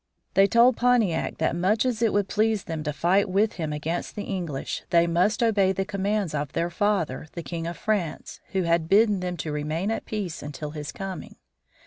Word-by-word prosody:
They 195 +1 +5
told 235 +3 +5
Pontiac 235 -9 +2
that 160 - 0
much 195 +7 +2
as 240 -3 -1
it 225 -2 +3
would 205 -1 +1
please 215 0 +1
them 160 -2 -4
to 150 - 0
fight 185 +6 +2
with 205 +4 +2
him 155 -1 -2
against 155 +3 -3
the 205 - -4
English, 175 -9 -4
they 170 0 +4
must 180 +7 +2
obey 200 -4 +3
the 190 +1 -2
commands 200 -2 -1
of 145 -2 -3
their 170 +1 -1
father, 200 -6 0
the 170 - -6
King 165 -1 -4
of 170 - -5
France, 195 -8 -2
who 190 -1 +1
had 170 -1 +1
bidden 210 0 +4
them 180 -1 -3
to 155 - -4
remain 155 +7 -2
at 225 - -3
peace 200 -7 -4
until 150 +1 -6
his 150 -1 -6
coming. 195 -3 -7
185 Hz, 200 wpm, -25 LUFS, 165-210 Hz, -, They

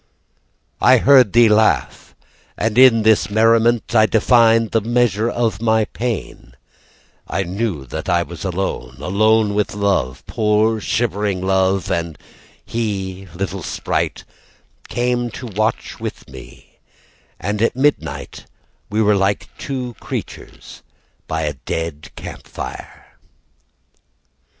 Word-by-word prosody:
I - - +6
heard 130 -6 +5
thee 120 0 +6
laugh, 110 0 +1 0.4
And 110 0 -1
in 125 -3 +6
this 110 -1 +3
merriment 115 +2 +2
I 110 -2 +5
defined 115 0 +3
the 115 - +2
measure 115 -1 +1
of 115 -5 -1
my 110 -1 +2
pain; 110 - -5 0.7
I 95 - -1
knew 95 -5 -3
that 60 - -6
I 85 0 +2
was 85 -1 -9
alone, 90 -9 -3
Alone 110 +5 +2
with 105 0 -1
love, 95 -11 -1
Poor 110 +1 +1
shivering 100 -5 -1
love, 95 +1 +1
And 85 -3 -2 0.5
he, 95 -4 -4
little 95 +1 -4
sprite, - - -2 0.6
Came 120 0 -1
to 130 - -8
watch 110 0 -2
with - - -6
me, 65 0 -14 0.6
And 100 +5 -3
at 115 - +2
midnight, 145 +3 -1 0.4
We 110 +2 +1
were 105 0 +4
like 100 +1 -1
two 125 -3 -4
creatures - - -8 0.5
by 80 0 -2
a 75 -1 -1
dead 75 +2 -5
camp - - -9
fire. - - -9
105 Hz, 120 wpm, -19 LUFS, 95-115 Hz, 0.7 s, I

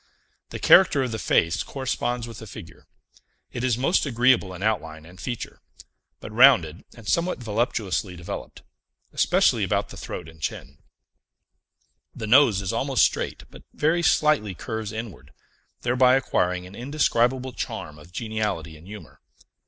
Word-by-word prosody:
The - - -6
character 155 -7 +5
of 125 - -3
the 110 - -4
face 85 -3 +1
corresponds 125 -3 -3
with 115 -1 -9
the 110 - -10
figure; 95 -4 -12 0.6
it 120 - -5
is 125 -3 +1
most 140 +9 +2
agreeable 125 -6 +2
in 95 +1 -7
outline 80 -7 -2
and 90 +2 -14
feature, 120 -3 -6 0.6
but - - -9
rounded 110 - +5
and 115 -3 -13
somewhat 170 - +1
voluptuously 110 -5 -2
developed, 85 0 -8 0.5
especially - - +3
about - - -1
the - - -10
throat - - -7
and 80 -1 -15
chin; - - -5 1.4
the - - -5
nose 115 -4 +5
is 95 - -2
almost - - +3
straight, - - -3
but - - -13
very 160 +3 +1
slightly 150 - +2
curves 110 +1 -5
inward, 100 - -8 0.5
thereby 125 +1 +4
acquiring 90 -8 0
an 90 - -12
indescribable 130 0 0
charm 75 -8 -6
of 75 +3 -16
geniality 105 -7 -3
and 80 +4 -16
humor. 105 +1 -12
110 Hz, 145 wpm, -24 LUFS, 90-130 Hz, 1.4 s, character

